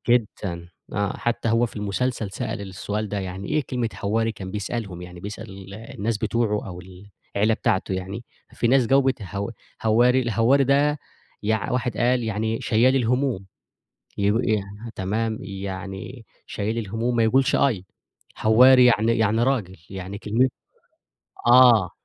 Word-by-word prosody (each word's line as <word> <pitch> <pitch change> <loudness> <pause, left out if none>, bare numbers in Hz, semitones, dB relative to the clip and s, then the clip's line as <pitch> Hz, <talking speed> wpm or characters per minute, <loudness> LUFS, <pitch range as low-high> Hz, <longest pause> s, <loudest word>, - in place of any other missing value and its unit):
جدًا، 100 -7 0 0.2
آه، 100 -1 -1
حتّى 120 0 -1
هو 115 +2 +3
في 110 - -13
المسلسل 105 +1 -2
سأل 100 - -4
السؤال 100 +2 -4
ده، 105 - -3
يعني 95 +1 -6
إيه 155 - +1
كلمة 125 -3 -1
هواري؟ 115 +3 0
كان 95 -3 -8
بيسألهم، 100 -2 -4
يعني 90 0 -10
بيسأل 100 -1 -8
الناس 110 0 -4
بتوعه، 105 -2 0
أو 90 -1 -7
ال 95 +1 -14 0.3
العيلة 110 +2 +3
بتاعته 95 -2 0
يعني، 95 +5 -5 0.3
في - - -1
ناس 130 -1 +4
جاوبت 135 -2 +2
هو 100 +2 -4 0.3
هوّاري، 120 +4 +4
الهوّاري 120 +4 +3
ده 145 +2 +2 0.4
يع 110 0 0
واحد 125 -1 -1
قال 125 +1 +2
يعني 110 +1 -2
شيال 130 +1 +3
الهموم، 125 -4 0 0.7
يب 100 +1 +2
ي 110 -2 +2 0.3
تمام، 110 +4 -1
يعني 95 +4 -7 0.2
شيال 110 +3 -3
الهموم 115 +3 -2
ما 115 - +3
يقولش 130 +4 +3
أي، 110 -10 +1 0.5
هوّاري 125 +4 +6
يعني 115 -1 +3
يعني 110 +1 +2
راجل، 110 -8 -1
يعني 95 +1 -6
كلم 115 +5 +1 1.0
آه، 125 0 +8
آه. 90 - -9
110 Hz, 145 wpm, -24 LUFS, 100-120 Hz, 1.0 s, آه